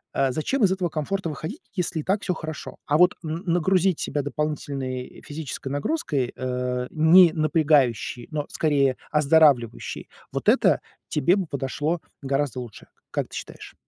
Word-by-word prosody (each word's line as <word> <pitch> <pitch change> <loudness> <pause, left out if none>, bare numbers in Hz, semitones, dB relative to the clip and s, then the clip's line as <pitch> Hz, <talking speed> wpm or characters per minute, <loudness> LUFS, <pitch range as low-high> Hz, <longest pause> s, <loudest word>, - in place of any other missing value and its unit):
э, 135 -1 +2
зачем 220 - -1
из 190 - +5
этого 185 -2 0
комфорта 165 +5 -2
выходить, 160 - -6
если 180 -3 -2
и - - -3
так 195 +5 0
всё 180 - -1
хорошо? 155 -1 -7
А 150 +1 +2
вот 180 0 +5
н 160 +4 -4
нагрузить 180 +1 +2
себя 145 0 -1
дополнительной 140 -3 -4
физической 145 -3 -6
нагрузкой, 145 - -1
э, 125 0 -2
не 165 +2 +6
напрягающей, 150 - +2
но 150 -1 -2
скорее 140 -4 +2 0.2
оздоравливающей,- 145 -6 +3 0.2
вот - - +1
это - - +4 0.3
тебе 175 +8 +2
бы 190 -5 -2
подошло 145 +4 -2 0.2
гораздо 135 -2 -1
лучше. 120 -4 -9 0.2
Как - - -1
ты - - -10
считаешь? - - -8
150 Hz, 150 wpm, -24 LUFS, 135-170 Hz, 0.3 s, не